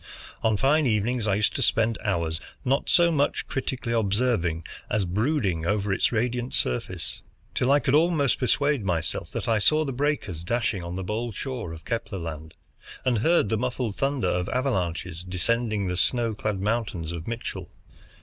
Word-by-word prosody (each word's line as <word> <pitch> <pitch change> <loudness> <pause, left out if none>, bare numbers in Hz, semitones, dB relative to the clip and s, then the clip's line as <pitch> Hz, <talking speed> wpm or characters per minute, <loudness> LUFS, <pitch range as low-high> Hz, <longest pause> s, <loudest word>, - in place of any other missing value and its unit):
On 110 -2 +2
fine 145 +5 +3
evenings 110 +1 +1
I 100 - +3
used 105 0 +1
to - - -1
spend 115 -1 +2
hours, 85 -6 0 0.3
not 135 +2 +1
so 170 -1 +5
much 145 -2 +1
critically 130 -3 -2
observing 100 -6 +1 0.3
as 105 -2 +1
brooding 100 - 0
over 100 0 +1
its - - +2
radiant 120 +2 -1
surface, 60 - -2 0.3
till 125 - +2
I 145 - +7
could 135 - 0
almost 155 -4 +3
persuade 140 0 +2
myself 85 -2 -1
that - - -3
I 115 -2 +3
saw 155 +8 +4
the 135 - -3
breakers 125 - -1
dashing 105 -2 0
on 85 +1 -5
the 95 - -3
bold 110 +3 -3
shore 125 -10 -4
of 80 -1 -10
Kepler 115 -3 -3
Land, 80 -2 -6 0.5
and 125 -4 +2
heard 160 - +3
the 110 - +1
muffled 125 -3 -2
thunder 135 -7 0
of 90 +1 0
avalanches 90 - -1
descending 105 +3 0
the 90 -1 -1
snow 115 +3 +2
clad 105 -1 -2
mountains 100 -6 -1
of 85 -1 -6
Mitchell. 105 -6 -5
110 Hz, 170 wpm, -26 LUFS, 90-125 Hz, 0.5 s, I